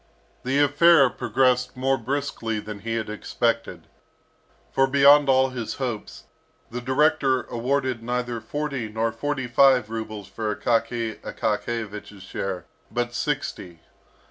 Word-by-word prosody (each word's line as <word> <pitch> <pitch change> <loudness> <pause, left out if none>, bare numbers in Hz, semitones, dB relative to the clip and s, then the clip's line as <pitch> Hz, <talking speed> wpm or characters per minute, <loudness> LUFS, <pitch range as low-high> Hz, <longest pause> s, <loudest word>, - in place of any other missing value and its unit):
The 130 +2 0
affair 145 -1 +5
progressed 125 -1 +1
more 135 +1 +2
briskly 120 -3 -3
than 105 -1 -7
he 115 +2 -3
had 110 -2 -2
expected. 105 -4 -2 0.9
For 135 0 +3
beyond 140 +1 +6
all 130 0 +4
his 125 -4 -5
hopes, 120 -6 -5 0.5
the 125 +1 -4
director 130 -1 +2
awarded 125 +1 -1
neither 120 0 -3
forty 140 -1 -3
nor 110 +1 -1
forty 130 +3 -3
five 125 -2 +4
rubles 110 -3 -5
for 105 +1 -3
Akaky 115 -1 -1
Akakiyevich's 105 -4 -4
share, 95 -2 -4 0.2
but 120 0 -2
sixty. 120 - -3
120 Hz, 120 wpm, -24 LUFS, 110-135 Hz, 0.9 s, beyond